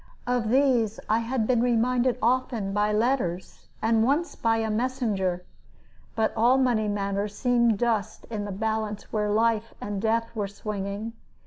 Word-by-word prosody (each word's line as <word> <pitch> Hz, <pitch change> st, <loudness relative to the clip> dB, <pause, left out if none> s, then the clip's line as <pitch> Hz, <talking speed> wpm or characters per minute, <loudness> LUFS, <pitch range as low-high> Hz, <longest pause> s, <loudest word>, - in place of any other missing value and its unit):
Of 245 Hz, -3 st, 0 dB
these 245 Hz, -4 st, +2 dB
I 220 Hz, +1 st, +2 dB
had 230 Hz, 0 st, -1 dB
been 240 Hz, 0 st, +2 dB
reminded 245 Hz, +1 st, +2 dB
often 235 Hz, -4 st, 0 dB
by 210 Hz, +1 st, +1 dB
letters, 210 Hz, -5 st, -1 dB, 0.2 s
and 225 Hz, 0 st, +3 dB
once 290 Hz, +8 st, +1 dB
by 225 Hz, -1 st, +1 dB
a 220 Hz, -1 st, -1 dB
messenger; 215 Hz, -7 st, -1 dB, 0.7 s
but 220 Hz, -1 st, +1 dB
all 240 Hz, +4 st, +4 dB
money 240 Hz, -5 st, +2 dB
matters 200 Hz, 0 st, -2 dB
seemed 235 Hz, -3 st, +2 dB
dust 215 Hz, -2 st, -1 dB
in 210 Hz, -2 st, -3 dB
the 205 Hz, -, -5 dB
balance 215 Hz, +1 st, -3 dB
where 210 Hz, -1 st, 0 dB
life 225 Hz, +1 st, +1 dB
and 205 Hz, -1 st, -4 dB
death 230 Hz, +1 st, 0 dB
were 205 Hz, -2 st, -1 dB
swinging. 205 Hz, +2 st, -5 dB
225 Hz, 150 wpm, -26 LUFS, 210-240 Hz, 0.7 s, all